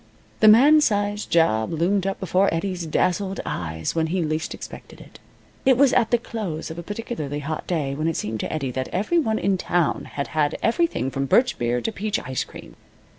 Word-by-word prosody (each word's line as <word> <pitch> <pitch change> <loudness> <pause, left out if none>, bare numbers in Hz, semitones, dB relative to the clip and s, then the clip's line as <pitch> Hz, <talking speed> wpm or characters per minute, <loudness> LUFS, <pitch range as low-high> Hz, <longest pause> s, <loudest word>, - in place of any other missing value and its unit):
The 215 - +5
man 280 +8 +7
size 205 -4 0
job 135 -10 +2
loomed 180 +4 +1
up 195 - -2
before 190 +2 +2
Eddie's 175 0 -2
dazzled 190 +4 0
eyes 80 -2 -3
when 160 -1 0
he 175 +1 -1
least 155 0 -2
expected - - -10
it. - - -15 0.4
It 260 -2 +4
was 275 -1 +5
at 225 - +3
the 240 - +4
close 195 -9 -5
of 160 - -7
a - - -4
particularly 190 - -5
hot 155 +2 -5
day 150 -6 -1
when 155 +3 -2
it 165 - -1
seemed 110 +1 -3
to - - -3
Eddie 140 -4 -2
that 130 +1 -3
every 215 - +1
one 220 -8 0
in 195 -2 0
town 175 -3 0
had 140 - -3
had 150 -2 0
everything 240 - +1
from 135 +1 -2
birch 250 - +3
beer 120 0 0
to 225 - -2
peach 210 0 -2
ice 130 0 -2
cream. - - -13
175 Hz, 205 wpm, -23 LUFS, 150-210 Hz, 0.4 s, man